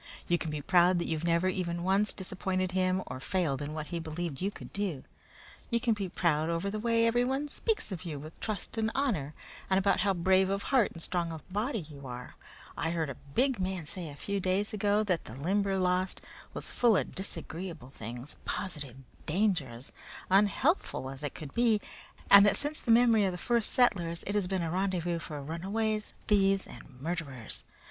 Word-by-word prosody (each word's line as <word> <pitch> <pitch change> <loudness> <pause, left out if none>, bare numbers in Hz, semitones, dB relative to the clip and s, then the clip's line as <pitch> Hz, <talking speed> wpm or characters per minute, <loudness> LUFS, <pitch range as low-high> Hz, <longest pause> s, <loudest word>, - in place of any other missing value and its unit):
You 175 0 +2
can 160 - -3
be 150 -1 -4
proud 180 +2 +5
that 170 - -1
you've 160 0 -2
never 170 +2 +3
even 175 -2 -1
once 195 +3 +3
disappointed 185 -1 -2
him 185 0 +1
or - - -6
failed 150 -3 0
in 150 +1 -4
what 155 -1 -3
he 170 - -1
believed 160 -2 -4
you 195 - +1
could - - -11
do. 195 -9 -2 0.7
You 235 - +2
can 235 -1 +2
be 200 -3 -3
proud 160 -3 +1
over 170 +4 -1
the 215 - -3
way 230 +1 +3
everyone 250 +5 +1
speaks 425 - -1
of 180 -3 -5
you 160 -5 -4
with 155 +3 -10
trust 215 +1 -3
and 220 0 +2
honor, 190 - 0 0.3
and 190 - +4
about 195 +1 +3
how 200 -2 +2
brave 190 +2 +4
of 195 +1 -1
heart 260 -6 +3
and 165 - -8
strong 170 -2 -1
of 160 -2 -8
body 215 - -1
you 140 -3 -10
are 125 0 -7 0.4
I 165 - -1
heard 165 -4 -1
a - - -4
big 215 - 0
man 185 -3 -2
say 170 +1 -3
a 145 - -9
few 200 +6 -2
days 190 +3 0
ago 210 0 +2
that 185 -5 0
the 110 - -8
Limberlost 185 +3 +1 0.4
was - - -5
full 235 -4 +4
of - - -2
disagreeable 170 -7 -4
things 120 +4 -7
positive 150 - -3 0.3
dangers, 155 - 0 0.4
unhealthful 205 - +2
as 135 +1 -9
it 145 -2 -4
could 150 -3 -8
be, 235 -3 +3 0.5
and 200 0 +11
that 205 - +4
since 295 +1 +1
the - - -7
memory 230 -2 +6
of 185 - 0
the - - -4
first 235 +4 +1
settlers 175 -10 +2
it 200 - -2
has 205 -3 +2
been 185 -2 -1
a 165 - -2
rendezvous 175 -2 0
for 150 -3 -6
runaways, 210 +7 -2
thieves, 195 -2 +3
and 130 -2 -13
murderers. 140 - -5
185 Hz, 195 wpm, -30 LUFS, 160-205 Hz, 0.7 s, and